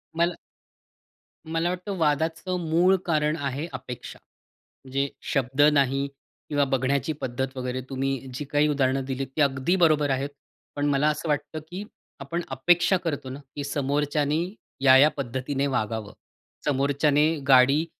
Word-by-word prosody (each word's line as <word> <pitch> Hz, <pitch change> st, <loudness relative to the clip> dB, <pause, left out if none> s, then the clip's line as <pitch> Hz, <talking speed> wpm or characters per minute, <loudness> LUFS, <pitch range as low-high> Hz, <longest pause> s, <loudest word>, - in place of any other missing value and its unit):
मला 170 Hz, +1 st, +1 dB, 1.1 s
मला 165 Hz, +2 st, -1 dB
वाटतं 185 Hz, +3 st, -4 dB
वादाचं 160 Hz, +3 st, 0 dB
मूळ 175 Hz, +4 st, +4 dB
कारण 155 Hz, -2 st, +1 dB
आहे, 145 Hz, +1 st, -3 dB
अपेक्षा. 125 Hz, 0 st, -8 dB, 0.7 s
जे 140 Hz, +1 st, +1 dB, 0.2 s
शब्द 135 Hz, 0 st, +1 dB
नाही 140 Hz, -1 st, +2 dB, 0.4 s
किंवा 145 Hz, -1 st, +2 dB
बघण्याची 135 Hz, +3 st, +1 dB
पद्धत 130 Hz, +1 st, -3 dB
वगैरे. 125 Hz, 0 st, -3 dB
तुम्ही 135 Hz, -1 st, -2 dB
जी 145 Hz, +4 st, -5 dB
काही 145 Hz, +2 st, +2 dB
उदाहरणं 135 Hz, -2 st, +1 dB
दिलीत, 135 Hz, 0 st, -3 dB
ती 155 Hz, -, +1 dB
अगदी 140 Hz, +5 st, +2 dB
बरोबर 150 Hz, -3 st, +4 dB
आहेत. 135 Hz, +1 st, 0 dB, 0.5 s
पण 145 Hz, -, -1 dB
मला 145 Hz, +1 st, +2 dB
असं 155 Hz, +2 st, -3 dB
वाटतं 150 Hz, +1 st, -1 dB
की 185 Hz, +3 st, -5 dB, 0.4 s
आपण 155 Hz, +5 st, -3 dB
अपेक्षा 175 Hz, +8 st, +3 dB
करतो 145 Hz, -5 st, -3 dB
ना, 130 Hz, +2 st, -7 dB, 0.2 s
की 145 Hz, -, -3 dB
समोरच्याने 145 Hz, +2 st, 0 dB, 0.4 s
या-या 135 Hz, +2 st, +7 dB
पद्धतीने 135 Hz, +2 st, -2 dB
वागावं, 110 Hz, -5 st, -2 dB, 0.5 s
समोरच्याने 145 Hz, +1 st, +2 dB, 0.2 s
गाडी 135 Hz, +4 st, +6 dB
140 Hz, 135 wpm, -25 LUFS, 135-155 Hz, 1.1 s, या-या